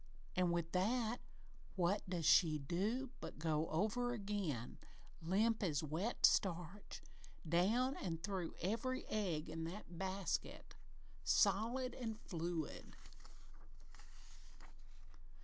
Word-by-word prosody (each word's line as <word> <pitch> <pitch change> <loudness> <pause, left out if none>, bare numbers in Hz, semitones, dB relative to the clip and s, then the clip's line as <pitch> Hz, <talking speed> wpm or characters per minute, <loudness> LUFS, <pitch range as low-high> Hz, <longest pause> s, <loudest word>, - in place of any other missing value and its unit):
An' 180 -1 +3
with 170 -1 0
that, 225 +5 +1 0.6
what 190 +2 +2
does 175 -3 -1
she 155 -1 +6
do 205 - -1
but - - -7
go 155 0 0
over 220 +8 +1
again, 195 - -3 0.4
limp 210 +7 +2
as 160 -7 +1
wet 165 +10 +1
starch, 180 +1 +1 0.4
down 220 - +3
an' 165 -3 -2
through 185 -1 -3
every 230 +8 -1
egg 180 -8 -1
in 160 +1 -4
that 175 -1 -7
basket, 190 0 -2 0.5
solid 230 +6 +3
an' 225 -3 -4
fluid! 170 -6 -4
190 Hz, 100 wpm, -39 LUFS, 165-220 Hz, 0.6 s, she